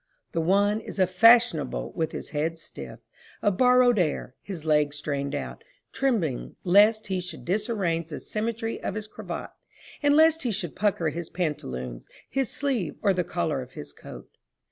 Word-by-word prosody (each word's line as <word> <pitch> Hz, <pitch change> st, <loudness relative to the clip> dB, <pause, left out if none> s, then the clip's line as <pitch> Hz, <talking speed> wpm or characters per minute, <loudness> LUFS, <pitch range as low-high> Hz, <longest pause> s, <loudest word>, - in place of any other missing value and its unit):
The 165 Hz, -, 0 dB
one 200 Hz, +5 st, +3 dB
is -, -, -8 dB
a 190 Hz, -, +5 dB
fashionable 185 Hz, -, +4 dB
with 160 Hz, -3 st, -2 dB
his -, -, -6 dB
head 160 Hz, +2 st, -1 dB
stiff, -, -, -9 dB, 0.4 s
a 205 Hz, -, +4 dB
borrowed 250 Hz, +2 st, +5 dB
air, 155 Hz, -6 st, -1 dB
his 175 Hz, -6 st, -7 dB
leg 150 Hz, -2 st, +2 dB
strained 140 Hz, -1 st, -3 dB
out, -, -, -6 dB, 0.3 s
trembling 205 Hz, -, -1 dB
lest 210 Hz, +4 st, +5 dB
he 190 Hz, -1 st, -1 dB
should 180 Hz, -2 st, -7 dB
disarrange 185 Hz, -4 st, -1 dB
the 150 Hz, -, -5 dB
symmetry 225 Hz, +1 st, -3 dB
of 200 Hz, -, -3 dB
his 215 Hz, -1 st, -4 dB
cravat, 215 Hz, -, -7 dB, 0.5 s
and 290 Hz, 0 st, +4 dB
lest 320 Hz, +1 st, +5 dB
he 250 Hz, -, -1 dB
should 180 Hz, -7 st, -3 dB
pucker 190 Hz, -5 st, +1 dB
his 165 Hz, +2 st, -5 dB
pantaloons, 65 Hz, -, -4 dB, 0.2 s
his 270 Hz, -3 st, -1 dB
sleeve 260 Hz, -, -1 dB
or 200 Hz, -2 st, +4 dB
the 180 Hz, -1 st, 0 dB
collar 165 Hz, -5 st, -1 dB
of 125 Hz, -, -11 dB
his 75 Hz, 0 st, -9 dB
coat. -, -, -11 dB
185 Hz, 165 wpm, -26 LUFS, 155-220 Hz, 0.5 s, a